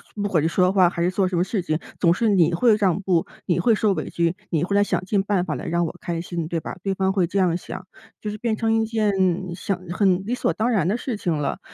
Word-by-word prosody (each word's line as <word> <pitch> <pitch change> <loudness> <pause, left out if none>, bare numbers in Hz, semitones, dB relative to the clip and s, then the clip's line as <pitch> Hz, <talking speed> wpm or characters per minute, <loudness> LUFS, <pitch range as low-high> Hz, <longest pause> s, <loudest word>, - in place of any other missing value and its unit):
不 205 - -3
管 175 -6 +1
是 160 - +1
说 180 +3 +3
话 185 -3 +5
还 170 -1 -2
是 180 - +2
做 190 0 +1
什 185 - -3
么 175 - +3
事 200 0 -2
情 155 -3 -1 0.2
总 170 - +4
是 225 +6 +1
“你 175 -3 +3
会 225 +4 +4
让 195 -4 +1
步、 180 -4 +1 0.2
你 175 -1 +1
会 225 +5 +3
受 210 -2 +2
委 - - -4
屈、 170 0 0
你 160 -2 0
会 200 +3 -1
来 205 - +5
想 195 - -1
尽 195 +1 +1
办 195 -2 0
法 155 - -2
来 - - -5
让 170 +1 +1
我 160 - -5
开 170 -1 -3
心， 170 -2 -4
对 165 0 -2
吧？” - - -7
对 195 -1 -1
方 190 0 +1
会 185 -3 +2
这 195 - -3
样 180 -3 +3
想。 180 +1 -7 0.3
就 210 - -4
是 210 - -6
变 230 -1 0
成 225 0 +1
一 225 0 +2
件 220 -2 0 0.4
想 195 0 -3
很 185 0 +2
理 230 - -2
所 250 - 0
当 225 +3 0
然 190 -8 +1
的 210 - +1
事 245 -2 -4
情 180 -4 -2
了。 145 - -2
185 Hz, 300 characters per minute, -23 LUFS, 170-205 Hz, 0.4 s, 话